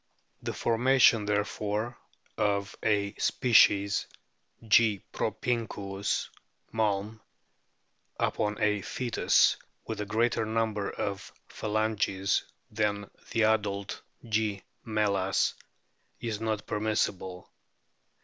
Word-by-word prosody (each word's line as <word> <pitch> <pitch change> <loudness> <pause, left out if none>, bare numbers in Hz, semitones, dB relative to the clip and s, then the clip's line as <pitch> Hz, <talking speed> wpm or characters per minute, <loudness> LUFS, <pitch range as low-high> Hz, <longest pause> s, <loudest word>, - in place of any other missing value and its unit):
The - - -3
formation 115 -2 +4
therefore 105 +2 -1 0.4
of 100 -1 0
a 100 -1 +1
species 100 -4 +4 0.6
(G. 110 -3 +4
propinquus, 100 -5 -2 0.5
Malm) 110 0 0 1.0
upon 105 0 0
a 105 -1 +1
fcetus 120 +4 +2 0.3
with - - -4
a 105 - -4
greater 115 +2 +1
number 110 -2 -1
of 100 0 -4 0.2
phalanges 105 -2 0 0.3
than 105 -1 -1 0.2
the 115 - +1
adult 105 -2 0 0.3
G. 105 -3 0 0.2
me/as 100 -4 +1 0.7
is 110 -2 -4
not 110 -2 -2
permissible. 105 -4 -2
105 Hz, 85 wpm, -29 LUFS, 100-110 Hz, 1.0 s, formation